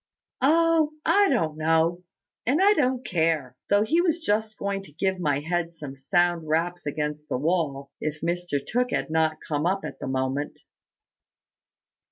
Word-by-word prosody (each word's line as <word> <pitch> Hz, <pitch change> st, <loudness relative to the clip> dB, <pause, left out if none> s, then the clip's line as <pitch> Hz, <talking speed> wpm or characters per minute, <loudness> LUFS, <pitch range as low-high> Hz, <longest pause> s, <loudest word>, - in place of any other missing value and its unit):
"Oh, 320 Hz, +2 st, +3 dB
I 405 Hz, 0 st, +4 dB
don't 160 Hz, -, 0 dB
know; 165 Hz, +2 st, +2 dB, 0.5 s
and 275 Hz, +6 st, +3 dB
I 400 Hz, +2 st, +6 dB
don't 260 Hz, -7 st, 0 dB
care 160 Hz, -7 st, 0 dB
though 205 Hz, +1 st, +4 dB
he 325 Hz, +10 st, +2 dB
was 340 Hz, -2 st, +1 dB
just 220 Hz, -7 st, -1 dB
going 200 Hz, 0 st, -2 dB
to 195 Hz, -, -14 dB
give 190 Hz, +5 st, -1 dB
my 145 Hz, -4 st, 0 dB
head 170 Hz, +1 st, -2 dB
some 145 Hz, -4 st, -8 dB
sound 175 Hz, +3 st, +1 dB
raps 170 Hz, +2 st, -1 dB
against 150 Hz, +1 st, -3 dB
the -, -, 0 dB
wall, 140 Hz, -3 st, -1 dB
if 155 Hz, 0 st, -3 dB
Mr 175 Hz, -2 st, -1 dB
Tooke 250 Hz, +2 st, 0 dB
had 160 Hz, -, -2 dB
not 160 Hz, -1 st, +2 dB
come 150 Hz, +1 st, 0 dB
up 195 Hz, +2 st, -1 dB
at -, -, -7 dB
the -, -, -5 dB
moment." 130 Hz, +2 st, -2 dB
170 Hz, 165 wpm, -25 LUFS, 150-215 Hz, 0.5 s, I